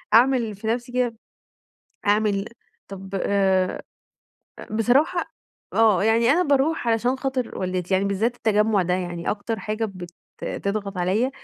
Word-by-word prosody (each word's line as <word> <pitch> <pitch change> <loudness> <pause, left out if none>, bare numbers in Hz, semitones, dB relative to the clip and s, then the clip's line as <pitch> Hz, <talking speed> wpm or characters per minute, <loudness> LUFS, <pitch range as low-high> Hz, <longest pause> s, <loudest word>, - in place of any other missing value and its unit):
أعمل 235 -3 +4
في 220 +3 -7
نفسي 240 +2 -1
كده، 245 -2 0 0.9
أعمل 205 -1 +2 0.4
طب 195 -1 -9
آآ 190 -2 +1 0.9
بصراحة 290 - +1 0.4
آه، 215 -4 +4
يعني 230 +2 +3
أنا 355 +4 +3
باروح 285 -2 +1
علشان 240 +3 +1
خاطر 260 -3 -3
والدتي، 185 0 -2
يعني 190 +1 +2
بالذات 210 +5 0
التجمع 215 -3 +2
ده 180 +1 0
يعني 175 -2 -3
أكتر 215 +1 -3
حاجة 215 +3 -2
بت 185 -4 -8 0.5
تضغط 200 -1 -2
عليَّ، 195 +8 +1
215 Hz, 130 wpm, -23 LUFS, 195-245 Hz, 0.9 s, أعمل